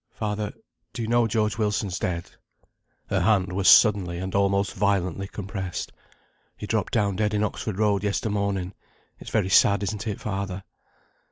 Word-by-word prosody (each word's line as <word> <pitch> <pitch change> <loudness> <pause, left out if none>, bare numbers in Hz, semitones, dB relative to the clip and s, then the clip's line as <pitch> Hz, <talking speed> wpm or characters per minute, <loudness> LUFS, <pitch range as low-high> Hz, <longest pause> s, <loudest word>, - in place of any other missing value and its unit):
"Father, 105 -1 -3 0.4
do 115 - -4
you - - -3
know 120 0 +3
George 110 0 0
Wilson's 105 -4 -1
dead?" 85 -2 -3 0.8
(Her - - +2
hand 95 -1 +2
was 95 0 0
suddenly 95 -6 +5
and 95 +1 -5
almost 100 0 +1
violently 95 -1 0
compressed.) 95 -3 -5 0.7
"He - - -6
dropped - - -1
down 100 -2 +1
dead 105 0 0
in 105 - +1
Oxford 105 -1 -3
Road 105 -2 +1
yester 105 +1 -1
morning. 100 -2 -1 0.5
It's - - -9
very 95 - 0
sad, 100 +2 +5
isn't 105 +2 -3
it, 105 - -3
father?" 100 -2 -4
100 Hz, 160 wpm, -25 LUFS, 95-105 Hz, 0.8 s, suddenly